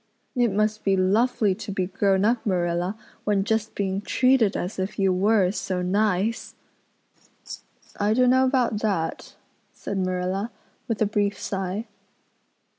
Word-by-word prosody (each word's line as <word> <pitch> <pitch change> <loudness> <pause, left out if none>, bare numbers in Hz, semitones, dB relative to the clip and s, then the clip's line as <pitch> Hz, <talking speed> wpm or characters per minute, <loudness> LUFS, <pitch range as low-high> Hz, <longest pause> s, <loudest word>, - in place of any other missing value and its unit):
It 240 -3 +2
must 215 +2 0
be 195 -1 +2
lovely 205 +2 +2
to 195 - -7
be 190 -1 -1
grown 195 +1 +1
up, 230 +1 +1
Marilla, 175 0 -1 0.3
when 205 -2 +1
just 220 +1 -1
being 195 -1 -1
treated 250 -2 +2
as 185 +2 -4
if 190 +2 -3
you 195 -2 +2
were 200 +2 +3
is 185 +3 -2
so 180 -1 -2
nice." 205 +3 0 1.4
"I 210 +2 +2
don't 250 0 +4
know 260 +1 +4
about 255 -5 +1
that," 195 -7 -2 0.4
said 200 - -5
Marilla, 185 +3 -1 0.4
with 225 -3 0
a - - +2
brief 205 -1 0
sigh. 195 +2 -3
200 Hz, 145 wpm, -24 LUFS, 190-220 Hz, 1.4 s, don't